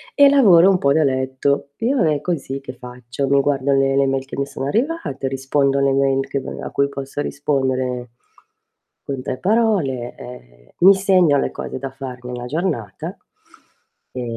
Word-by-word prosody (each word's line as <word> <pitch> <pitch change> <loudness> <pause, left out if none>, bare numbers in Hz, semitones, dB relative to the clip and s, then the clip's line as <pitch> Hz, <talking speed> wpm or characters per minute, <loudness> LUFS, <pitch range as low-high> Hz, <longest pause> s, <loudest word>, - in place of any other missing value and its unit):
e 285 -1 +7
lavoro 195 -11 +6
un 195 - +3
po' 140 -5 +2
da 160 - +3
letto. 130 +1 -1
Io 245 +5 +1
non 180 - +2
è 150 -2 0
così 140 -6 -3
che 135 - -8
faccio, 125 +2 -6
mi 140 +1 +3
guardo 140 -1 0
le 135 0 +2
le 140 - +3
mail 135 0 -1
che - - -8
mi 140 - 0
sono 140 -1 -6
arrivate, 230 - -2
rispondo 135 +1 0
alle 140 0 +2
mail 135 0 +1
che 140 - -2
maga - - -7
a - - -9
cui 140 - +1
posso 140 +1 -5
rispondere 130 -4 -2 0.9
con 135 -2 -5
3 130 - -4
parole, 185 - 0
ehm, - - -13
mi 195 +3 +8
segno 185 -6 +3
le - - -1
cose - - -6
da 135 +1 -5
fare 130 -2 -8
nella 125 0 -6
giornata, 125 - -3 1.0
e 125 - -5
135 Hz, 180 wpm, -20 LUFS, 130-155 Hz, 1.0 s, mi